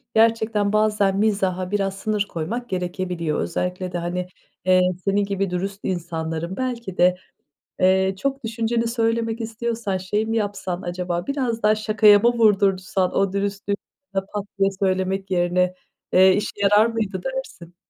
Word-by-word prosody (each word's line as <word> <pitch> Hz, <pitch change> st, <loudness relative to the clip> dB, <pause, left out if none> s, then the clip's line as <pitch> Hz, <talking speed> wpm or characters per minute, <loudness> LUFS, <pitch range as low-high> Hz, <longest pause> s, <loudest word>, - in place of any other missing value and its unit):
Gerçekten 220 Hz, -2 st, +3 dB
bazen 210 Hz, -2 st, +2 dB
mizaha 190 Hz, -3 st, 0 dB
biraz 195 Hz, -2 st, 0 dB
sınır 210 Hz, 0 st, -1 dB
koymak 225 Hz, +10 st, -4 dB
gerekebiliyor. 180 Hz, -3 st, -2 dB
Özellikle 180 Hz, -, -3 dB
de 175 Hz, -, -2 dB
hani, 180 Hz, +1 st, -3 dB, 0.4 s
eee, 185 Hz, 0 st, +5 dB, 0.2 s
senin 200 Hz, +1 st, +2 dB
gibi 195 Hz, -1 st, -2 dB
dürüst 195 Hz, +3 st, -3 dB
insanların 170 Hz, 0 st, -3 dB
belki 235 Hz, -7 st, -4 dB
de, 180 Hz, +1 st, +4 dB, 0.6 s
eee, 190 Hz, +1 st, +3 dB
çok 275 Hz, 0 st, -2 dB
düşünceni 230 Hz, +1 st, -1 dB
söylemek 230 Hz, 0 st, 0 dB
istiyorsan 225 Hz, -3 st, -2 dB
şey 205 Hz, +4 st, -1 dB
mi 225 Hz, +1 st, -1 dB
yapsan 200 Hz, -4 st, -2 dB
acaba, 175 Hz, 0 st, -3 dB
biraz 255 Hz, -5 st, -2 dB
daha 215 Hz, 0 st, +5 dB
şakaya 215 Hz, -1 st, +5 dB
mı 235 Hz, +3 st, +3 dB
vurdursan 195 Hz, -4 st, +2 dB
o 195 Hz, -1 st, +1 dB
dürüstlüğü 200 Hz, 0 st, -1 dB, 0.4 s
pat 195 Hz, +1 st, -3 dB
diye 195 Hz, 0 st, +4 dB
söylemek 190 Hz, 0 st, 0 dB
yerine, 180 Hz, 0 st, +1 dB, 0.4 s
eee, 190 Hz, +1 st, +7 dB
işe 210 Hz, -, -1 dB
yarar 205 Hz, +2 st, +5 dB
mıydı 215 Hz, -5 st, -2 dB
dersin? 265 Hz, -10 st, -6 dB
195 Hz, 140 wpm, -23 LUFS, 185-220 Hz, 0.6 s, eee